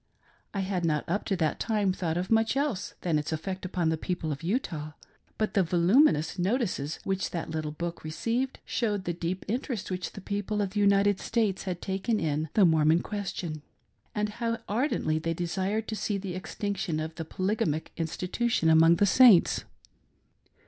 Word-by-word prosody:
I 200 - -2
had 185 -2 -2
not, 155 -3 +1
up 200 +5 -1
to 195 - 0
that 160 -4 0
time, 210 -4 +1
thought 170 -4 -2
of 180 +3 -3
much 225 +3 +3
else 275 -9 -1
than 165 -4 +1
its 150 - -4
effect 185 +4 -4
upon 175 -3 0
the 160 -1 -1
people 175 -3 -2
of 145 - -4
Utah; 165 - -2 0.4
but 215 - -1
the 200 - +4
voluminous 175 - +3
notices 185 - 0
which 190 -1 -1
that 165 -2 -4
little 155 -1 -2
book 170 +3 -5
received, 230 +11 -2
showed 210 -5 -1
the 175 - -2
deep 175 +2 -3
interest 230 -2 -3
which 180 -2 -3
the - - -8
people 205 +1 -2
of 200 -2 0
the 205 - -2
United 200 -1 +4
States 220 -5 0
hadi 180 -2 -3
taken 195 +4 -1
in 155 0 -1
" - - -40
the 205 - +6
Mormon 160 0 +4
question," 180 -6 -4 0.5
and 210 0 0
how 230 +2 -2
ardently 210 - 0
they 165 +1 -2
desired 190 +6 -1
to 220 - -2
see 210 -1 -1
the 190 -2 -5
extinction 195 -2 -3
of 155 +1 -4
the 165 - -5
polygamic 185 -2 -1
institution 180 +2 0
among 165 +1 +7
the 205 - +3
Saints. 215 -2 +6
185 Hz, 180 wpm, -28 LUFS, 165-210 Hz, 0.5 s, among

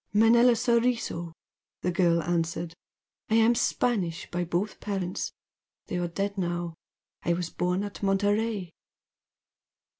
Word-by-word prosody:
"Manella 235 +3 +6
Soriso" 230 -7 +1 0.5
the 180 - +1
girl 170 -2 +3
answered 165 0 -1 0.6
"I 220 - +3
am 225 +1 +5
Spanish 200 -8 0
by 175 0 -1
both 175 +5 -2
parents, 190 -3 -3 0.5
they 180 - -3
are 175 - 0
dead 200 +3 -2
now. 175 -1 -2 0.5
I 170 - +1
was 170 0 -3
born 180 +2 0
at 205 0 -7
Monterey." 205 -1 +1
185 Hz, 120 wpm, -28 LUFS, 175-220 Hz, 0.6 s, Manella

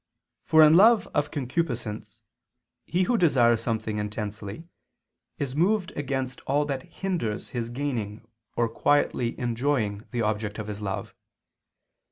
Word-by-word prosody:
For 160 0 +6
in 155 0 +7
love 220 +4 +6
of 145 0 +1
concupiscence 125 - -3 0.6
he 180 +2 +1
who 235 +4 +1
desires 120 -8 +4
something 110 -2 -2
intensely, 105 +6 -5 0.7
is 140 -2 -3
moved 185 +3 +2
against 135 -2 -3
all 145 +2 +2
that 135 -2 -3
hinders 170 - -3
his 120 -2 -3
gaining 120 -5 -4 0.3
or 120 - +2
quietly 120 0 +1
enjoying 120 -4 -1
the 120 -2 -1
object 105 0 -2
of 110 - -4
his 105 0 -6
love. 100 -2 -4
125 Hz, 130 wpm, -26 LUFS, 110-145 Hz, 0.7 s, in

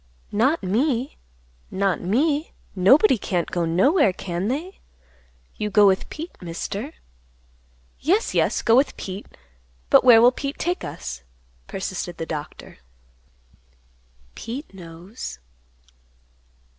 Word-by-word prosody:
"Not 265 +10 +1
me; 245 +6 0 0.5
not 195 -1 0
me; 285 - 0 0.2
nobody 250 - +5
can't 175 -3 -2
go 175 -1 0
nowhere, 200 - +3
can 180 +1 -4
they? 315 - -4 0.8
You 210 - -2
go 205 0 +5
with 190 -1 +2
Pete, 325 +3 -8
Mister." 195 - -5 1.1
"Yes, 385 - +1
yes; - - +1
go 230 - +4
with 270 +3 +2
Pete; 190 +2 -7 0.6
but - - +7
where 240 -3 +8
will 240 +2 +6
Pete 275 +2 -5
take 355 +2 -2
us?" 60 0 -6 0.5
persisted 185 -2 -5
the 165 - -4
Doctor. 150 - -7 1.5
"Pete 250 - -7
knows." 180 +5 -9
210 Hz, 110 wpm, -23 LUFS, 185-280 Hz, 1.5 s, where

